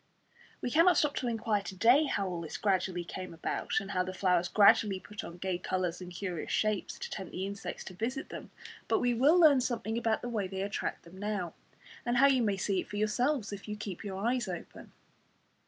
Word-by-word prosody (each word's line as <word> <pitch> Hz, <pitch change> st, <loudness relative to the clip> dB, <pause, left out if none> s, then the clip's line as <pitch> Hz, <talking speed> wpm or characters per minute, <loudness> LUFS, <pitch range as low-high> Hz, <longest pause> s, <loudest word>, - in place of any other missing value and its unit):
We 245 Hz, -, -2 dB
cannot 335 Hz, +4 st, +5 dB
stop 295 Hz, -1 st, +3 dB
to 250 Hz, -, -1 dB
inquire 225 Hz, -3 st, 0 dB
to 195 Hz, -, -7 dB
day 245 Hz, +10 st, +5 dB
how 185 Hz, -, -2 dB
this 160 Hz, -, -5 dB
all -, -, -17 dB
gradually 185 Hz, -3 st, +1 dB
came 185 Hz, 0 st, -7 dB
about, 165 Hz, -, -3 dB
and 195 Hz, -1 st, -7 dB
how 185 Hz, -2 st, +1 dB
the 185 Hz, +1 st, -4 dB
flowers 180 Hz, -2 st, +2 dB
gradually 200 Hz, -1 st, +5 dB
put 205 Hz, +2 st, -8 dB
on 170 Hz, -, -8 dB
gay 180 Hz, 0 st, -2 dB
colours 180 Hz, -1 st, -2 dB
and 180 Hz, 0 st, -8 dB
curious 180 Hz, -2 st, -4 dB
shapes 215 Hz, -3 st, 0 dB
to -, -, -5 dB
tempt 190 Hz, -4 st, -7 dB
the 185 Hz, -, -2 dB
insects 200 Hz, 0 st, -5 dB
to 190 Hz, -, -9 dB
visit 245 Hz, -, -3 dB
them; -, -, -8 dB, 0.4 s
but -, -, +3 dB
we 245 Hz, -1 st, +2 dB
will 285 Hz, +9 st, +5 dB
learn 295 Hz, -6 st, +7 dB
something 235 Hz, -2 st, -1 dB
about 225 Hz, -1 st, 0 dB
the -, -, -3 dB
way 210 Hz, -5 st, -1 dB
they 190 Hz, 0 st, -3 dB
attract 200 Hz, 0 st, -3 dB
them 175 Hz, +3 st, -13 dB
now, 205 Hz, -4 st, -2 dB, 0.5 s
and 240 Hz, 0 st, 0 dB
how 270 Hz, -, +7 dB
you 270 Hz, -2 st, +5 dB
may 205 Hz, -4 st, +1 dB
see 195 Hz, 0 st, 0 dB
it -, -, -10 dB
for 205 Hz, -, -5 dB
yourselves 220 Hz, +2 st, 0 dB
if 200 Hz, +1 st, -8 dB
you 210 Hz, -, -3 dB
keep 205 Hz, -3 st, -6 dB
your 195 Hz, -2 st, -5 dB
eyes 245 Hz, -2 st, +1 dB
open. 175 Hz, -2 st, -7 dB
205 Hz, 220 wpm, -31 LUFS, 185-240 Hz, 0.5 s, learn